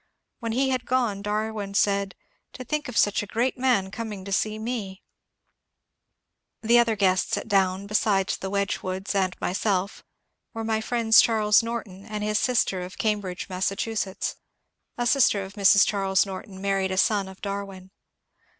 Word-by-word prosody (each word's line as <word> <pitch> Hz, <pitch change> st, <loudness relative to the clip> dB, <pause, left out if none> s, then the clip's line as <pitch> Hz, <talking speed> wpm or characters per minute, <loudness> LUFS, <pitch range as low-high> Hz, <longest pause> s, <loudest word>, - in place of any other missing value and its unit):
When 230 Hz, -2 st, -3 dB
he 265 Hz, +3 st, +1 dB
had 255 Hz, -1 st, -2 dB
gone 240 Hz, -6 st, 0 dB
Darwin 210 Hz, -1 st, -3 dB
said, 200 Hz, -2 st, +1 dB, 0.2 s
" -, -, -46 dB
To 255 Hz, -, -8 dB
think 300 Hz, +2 st, -3 dB
of 250 Hz, -, -5 dB
such 205 Hz, -, +3 dB
a 210 Hz, -, -7 dB
great 240 Hz, +5 st, 0 dB
man 245 Hz, -7 st, +1 dB
coming 210 Hz, -4 st, -6 dB
to 200 Hz, -, -7 dB
see 215 Hz, +2 st, 0 dB
me! 220 Hz, -4 st, -5 dB, 0.7 s
" -, -, -56 dB
The 235 Hz, +2 st, +5 dB
other 230 Hz, -2 st, +2 dB
guests 190 Hz, -2 st, +1 dB
at -, -, -5 dB
Down, 195 Hz, -2 st, +1 dB
besides 200 Hz, -2 st, +1 dB
the 190 Hz, -, -4 dB
Wedgwoods 195 Hz, -1 st, -2 dB
and 190 Hz, -2 st, 0 dB
my -, -, -2 dB
self, 200 Hz, 0 st, -1 dB, 0.5 s
were 225 Hz, -, -3 dB
my 220 Hz, 0 st, 0 dB
friends 225 Hz, -1 st, +5 dB
Charles 215 Hz, -2 st, +3 dB
Norton 225 Hz, -5 st, -6 dB
and 210 Hz, -1 st, -4 dB
his 210 Hz, 0 st, +1 dB
sister 225 Hz, -7 st, +1 dB
of 180 Hz, +1 st, -8 dB
Cam* 210 Hz, -1 st, +1 dB
bridge, 185 Hz, -3 st, -6 dB
Massachusetts. 195 Hz, +2 st, -2 dB, 0.6 s
A 240 Hz, -, -1 dB
sister 240 Hz, -6 st, +3 dB
of 190 Hz, +1 st, -9 dB
Mrs. 200 Hz, 0 st, +5 dB
Charles 195 Hz, -1 st, +1 dB
Norton 190 Hz, 0 st, -8 dB
married 195 Hz, -1 st, 0 dB
a 190 Hz, -, -3 dB
son 200 Hz, 0 st, +2 dB
of 190 Hz, 0 st, -12 dB
Darwin. 195 Hz, -2 st, -6 dB
205 Hz, 170 wpm, -25 LUFS, 190-225 Hz, 0.7 s, The